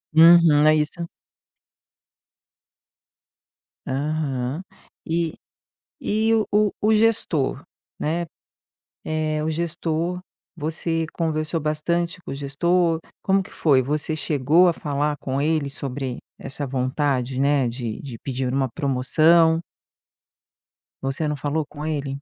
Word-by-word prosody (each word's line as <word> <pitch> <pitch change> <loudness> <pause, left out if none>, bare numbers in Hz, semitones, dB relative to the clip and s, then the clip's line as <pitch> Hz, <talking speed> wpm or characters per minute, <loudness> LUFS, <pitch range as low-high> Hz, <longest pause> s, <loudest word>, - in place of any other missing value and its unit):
Uhum. 165 -2 +7
É 155 - +6
isso. 155 +3 -1 2.8
Aham 140 0 -2 0.5
e 165 0 0 0.7
e, 220 +2 +1
o 220 -1 +2
o 210 0 +3
o 215 +1 +3
gestor, 210 -12 +2 0.4
né, 165 +3 -1 0.8
eh, 155 -1 -1
o 160 - -1
gestor, 165 +1 -2 0.4
você 165 +1 -2
conversou 160 0 -1
bastante 170 +4 -1
com - - -7
o - - -4
gestor? 165 +4 +1 0.2
Como 195 0 +3
que 185 - -11
foi? 140 -5 +3
Você 150 +4 -2
chegou 150 +4 +3
a 175 - +3
falar 145 -1 -2
com 135 0 -2
ele 155 -1 +1
sobre 135 -2 -4 0.2
essa 145 +1 -5
vontade, 130 0 -1
né, 140 -2 +3
de 115 -2 -4
de 125 -5 -8
pedir 130 -1 -3
uma 135 -1 +1
promoção? 160 +5 +3 1.4
Você 135 +3 -2
não 150 - -1
falou 145 +2 -2
com 150 0 -9
ele? 140 -3 -3
155 Hz, 115 wpm, -23 LUFS, 140-165 Hz, 2.8 s, Uhum